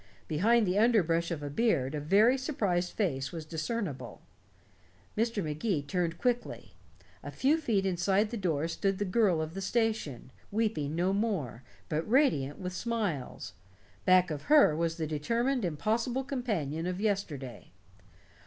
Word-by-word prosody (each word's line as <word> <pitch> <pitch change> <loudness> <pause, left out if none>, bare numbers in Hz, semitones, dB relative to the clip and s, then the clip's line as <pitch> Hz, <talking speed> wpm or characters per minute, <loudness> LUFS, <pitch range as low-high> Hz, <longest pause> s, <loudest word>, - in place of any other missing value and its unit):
Behind 215 +9 +3
the 185 +2 +1
underbrush 175 -8 +3
of 145 -4 -5
beard 165 - +1
a 150 - -2
very 200 - +4
surprised 205 - -1
face 135 -11 -1
was 165 -2 -6
discernible. 160 - -4 1.0
Mr. 225 -2 0
Magee 155 +1 -1
turned 170 +3 -2
quickly. 245 +3 -2 0.5
A - - -7
few 280 +4 +2
feet 220 -10 0
inside 190 +3 +1
the - - -3
door 165 -7 0
stood 195 +3 -1
the 205 - -1
girl 185 -5 +2
of 155 +1 -6
the 195 - -5
station, 215 - -1 0.2
weeping 200 -9 -1
no 180 +3 +1
more, 195 - -1 0.3
but 155 +6 -2
radiant 220 - +2
with 180 -1 -5
smiles. 190 - -3 0.5
Back 185 -1 +4
of 145 -1 -5
her 295 - +6
was 165 +1 -1
the 160 - -2
determined 230 - 0
impossible 225 - -1
companion 200 - -2
of 180 0 -3
yesterday. 160 - -3
185 Hz, 145 wpm, -30 LUFS, 155-225 Hz, 1.0 s, her